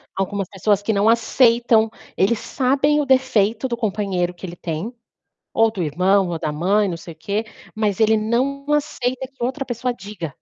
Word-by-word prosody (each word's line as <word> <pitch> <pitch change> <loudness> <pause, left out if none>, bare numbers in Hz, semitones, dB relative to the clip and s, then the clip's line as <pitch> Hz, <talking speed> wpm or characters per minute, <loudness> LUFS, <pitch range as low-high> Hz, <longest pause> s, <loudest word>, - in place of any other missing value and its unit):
algumas 195 0 -2
pessoas 205 +1 0
que 220 +2 0
não 200 +2 +3
aceitam, 230 -1 +3 0.3
eles 210 +4 +2
sabem 280 +3 +1
o - - -2
defeito 255 -3 +2
do 240 - -2
companheiro 195 -5 -1
que 180 - -9
ele 175 -1 -7
tem, 170 +8 -4 0.6
ou 225 0 +3
do 200 -5 -4
irmão, 185 +5 +2
ou 165 - -3
da 155 - -2
mãe, 195 +7 +1
não 170 - -3
sei 165 0 -10
o - - -19
quê, 205 +6 -2 0.3
mas 210 -3 -1
ele 220 0 +4
não 250 +6 0
aceita 265 -4 -1
que 270 -3 -6
outra 265 +3 -2
pessoa 245 0 -2
diga. 200 -6 -7
215 Hz, 185 wpm, -21 LUFS, 190-245 Hz, 0.6 s, ele